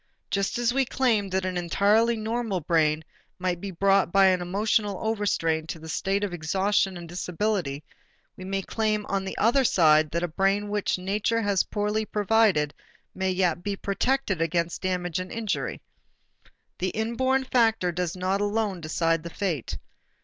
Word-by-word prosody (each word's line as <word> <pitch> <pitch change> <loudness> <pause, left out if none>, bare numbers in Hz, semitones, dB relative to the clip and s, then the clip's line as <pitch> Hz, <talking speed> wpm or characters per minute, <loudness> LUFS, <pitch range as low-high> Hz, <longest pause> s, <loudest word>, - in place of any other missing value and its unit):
Just 200 +2 0
as 240 0 +1
we 270 +1 +3
claimed 230 -6 +1
that 190 0 0
an 185 -1 -2
entirely 205 +7 +3
normal 220 -2 -2
brain 160 -1 +1 0.3
might 180 -1 -2
be 200 - -4
brought 195 0 +2
by 195 +1 +5
an 185 -1 +3
emotional 205 +2 0
overstrain 190 -7 0
to 165 - -5
a - - -8
state 195 +5 -1
of 200 -3 -2
exhaustion 190 +3 0
and 170 -1 -9
disability, 175 -4 -2 0.5
we 185 - -10
may 195 +1 -2
claim 215 -1 -1
on 195 -1 -1
the 190 - -5
other 240 +6 +3
side 155 -8 +4
that 170 +3 -2
a - - +1
brain 195 +4 0
which 205 -2 0
nature 210 +5 0
has 200 -2 +2
poorly 210 +1 -1
provided 210 -8 +2 0.4
may 190 0 -1
yet 180 -2 +1
be 205 +1 -2
protected 200 -1 -1
against 170 +1 -1
damage 180 -2 -1
and 185 0 -6
injury. 225 -3 -3 1.0
The 185 - 0
inborn 260 +6 0
factor 225 -8 +2
does 175 0 -2
not 190 +2 0
alone 205 -3 -1
decide 165 +1 0
the 170 - -7
fate. 170 - -3
195 Hz, 165 wpm, -26 LUFS, 175-215 Hz, 1.0 s, by